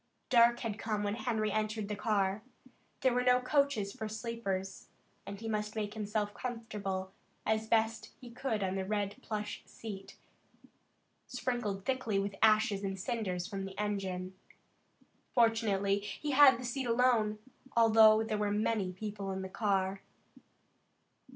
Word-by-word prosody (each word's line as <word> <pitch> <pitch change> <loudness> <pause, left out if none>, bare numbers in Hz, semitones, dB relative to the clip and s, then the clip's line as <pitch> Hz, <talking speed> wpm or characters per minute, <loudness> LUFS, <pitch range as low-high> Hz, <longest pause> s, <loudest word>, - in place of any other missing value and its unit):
Dark 240 -1 +5
had 230 - -2
already 205 - -8
come 215 -2 -1
when 205 0 0
Harry 220 -2 -1
entered 215 0 -1
the 210 - -3
car. 200 -1 0 0.6
There 260 -2 +3
were 250 - +2
no 250 0 +4
coaches 255 -6 +1
for 220 - -5
sleepers, 215 -4 -4 0.4
and 200 0 -6
he 225 - -6
must 210 -1 -2
make 210 -1 -2
himself 210 -1 -2
comfortable 200 -6 -4 0.3
as 220 0 0
best 225 0 +1
he 245 -2 -11
could 235 -4 -2
on 190 -1 -1
the 190 0 -1
red 205 0 -2
plush 210 -1 -4
seat, 200 -3 -9 1.1
sprinkled 240 -6 -3
thickly 255 -6 0
with 195 0 -1
ashes 215 -2 +4
and 195 -1 -3
cinders 185 -4 -2
from 195 -1 -4
the 195 0 -8
engine. 190 -3 -2 1.0
Fortunately, 215 -4 +3
he 210 +9 -5
had 270 -2 +8
the 250 - -6
seat 250 +1 -2
alone, 230 -3 +3 0.4
although 220 -1 +7
there 215 -1 -2
were 210 -1 +1
many 205 -2 0
people 200 +1 -5
in 190 0 -3
the 190 - -6
car. 195 -2 0
215 Hz, 150 wpm, -32 LUFS, 200-230 Hz, 1.1 s, had